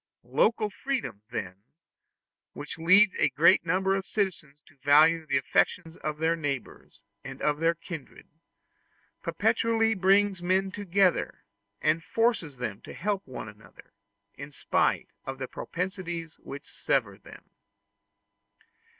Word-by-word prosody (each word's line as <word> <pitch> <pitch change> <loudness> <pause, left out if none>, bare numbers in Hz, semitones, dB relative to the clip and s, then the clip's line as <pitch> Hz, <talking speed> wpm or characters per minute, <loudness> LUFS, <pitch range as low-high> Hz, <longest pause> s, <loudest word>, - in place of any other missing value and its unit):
Local 215 -1 +1
freedom, 255 - -3
then, 90 -1 -5 1.0
which 150 +2 -7
leads 185 +5 +6
a - - +4
great 190 - +5
number 190 +3 +2
of 195 -1 -3
citizens 170 -8 -2
to 155 - -22
value 155 +4 +4
the 135 - +2
affection 150 +4 0
of 150 0 -2
their 160 +2 +1
neighbors 135 - -6 0.2
and 135 -1 -8
of 150 0 0
their 165 +1 +2
kindred, 165 -3 -9 0.9
perpetually 225 -1 +1
brings 195 -1 +3
men 190 +2 +1
together, 195 -2 +1 0.4
and 160 +2 +2
forces 225 - 0
them 110 -5 -5
to - - -10
help 200 +1 -1
one 125 -4 -7
another, 105 -1 -15 0.4
in 140 +1 -9
spite 145 - 0 0.2
of 135 0 -4
the 130 -1 -5
propensities 175 -2 -5
which 140 +1 -9
sever 105 -8 -1
them. - - -15
165 Hz, 125 wpm, -28 LUFS, 140-195 Hz, 1.0 s, leads